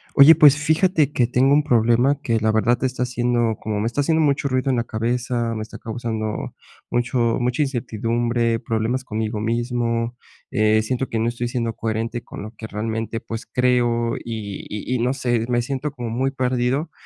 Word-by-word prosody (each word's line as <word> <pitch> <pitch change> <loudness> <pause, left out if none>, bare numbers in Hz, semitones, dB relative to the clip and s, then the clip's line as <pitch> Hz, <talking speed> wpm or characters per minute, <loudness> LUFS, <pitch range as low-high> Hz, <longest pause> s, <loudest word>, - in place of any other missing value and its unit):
Oye, 150 +3 +9
pues 150 -3 +7
fíjate 155 0 +2
que 125 -4 +2
tengo 125 +3 +3
un 150 - +3
problema 120 +2 +3
que 115 -5 0
la 110 0 +2
verdad, 115 +3 +2
está 130 -1 -1
haciendo 120 -2 0
como 105 -1 -3
me 110 - 0
está 120 +5 -1
haciendo 160 +3 +2
mucho 140 -2 +1
ruido 130 0 0
en 130 - +2
la 120 - 0
cabeza. 120 +1 -2
Me 110 - -3
está 110 - -10
causando 110 -2 -4 0.4
mucho 120 -1 +1
mucha 125 +4 +1
incertidumbre, 115 -2 -1
problemas 115 +2 -1
conmigo 110 -2 -3
mismo. 115 +1 -1 0.4
Eh, 110 +1 +3
siento 130 +3 -2
que 115 - -2
no 115 +1 +1
estoy 120 0 -3
siendo 120 -1 -2
coherente 115 +2 -3
con - - -9
lo 110 - -8
que 110 - -8
realmente 110 +1 -3
pues, 115 +1 -7
creo 120 -2 +1
y 110 -4 -6
y 105 +4 -4
y - - -1
no 125 +2 +1
sé, 120 -3 0
me 120 -1 +1
siento 140 +3 -3
como 120 -5 -5
muy 130 +4 0
perdido, 130 +3 -1
120 Hz, 185 wpm, -22 LUFS, 115-130 Hz, 0.4 s, Oye